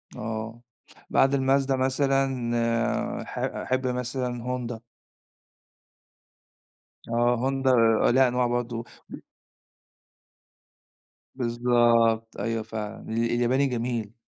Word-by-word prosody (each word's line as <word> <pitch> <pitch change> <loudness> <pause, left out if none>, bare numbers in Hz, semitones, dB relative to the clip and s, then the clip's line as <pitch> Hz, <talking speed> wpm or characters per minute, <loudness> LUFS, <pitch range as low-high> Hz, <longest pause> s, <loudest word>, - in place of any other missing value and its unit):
آه. 110 +1 -5 0.5
بعد 135 +1 +3
الMazda 135 0 +2
مثلًا، 130 -3 0
ح - - -9
أحب 130 0 -2
مثلًا 125 -1 -3
Honda. 120 -2 -4 2.3
آه 120 +1 +2
Honda 135 +1 0 0.3
آآ - - +4
ليها 130 +1 +5
أنواع 125 0 +1
برضو 120 -1 -2 0.2
و - - -7 2.2
بالضبط 120 -2 +2
أيوه 115 -1 -2
فعلًا. 105 -1 -7
ال 110 - -3
الياباني 120 +4 +2
جميل. 115 -3 -3
120 Hz, 90 wpm, -26 LUFS, 115-130 Hz, 2.3 s, ليها